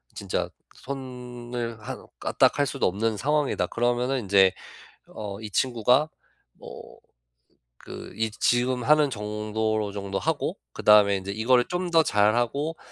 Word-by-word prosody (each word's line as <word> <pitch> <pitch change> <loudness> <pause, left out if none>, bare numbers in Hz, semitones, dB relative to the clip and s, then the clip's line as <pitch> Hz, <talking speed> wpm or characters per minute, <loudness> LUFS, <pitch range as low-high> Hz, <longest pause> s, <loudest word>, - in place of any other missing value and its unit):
진짜 100 -2 -3 0.3
'손을 125 -3 -6
한 130 0 -7
까딱할 - - +2
수도 - - 0
없는 110 +4 -1
상황이다.' 150 +4 0
그러면은 120 +2 0
인제 95 -3 +4 0.6
어 100 -2 -7
이 110 - -6
친구가 125 +6 +2 0.4
뭐 - - -12 0.8
그 - - -10
이 110 -1 -1
지금 125 +1 +2
하는 150 -2 +4
정도로 105 0 -2
정도 100 -1 -4
하고 - - -1 0.2
그다음에 105 -1 +5
이제 95 +1 -6
이거를 120 +3 +3
좀 180 0 -2
더 165 -1 +5
잘하고 120 +10 +1
120 Hz, 255 characters per minute, -25 LUFS, 105-130 Hz, 0.8 s, 그다음에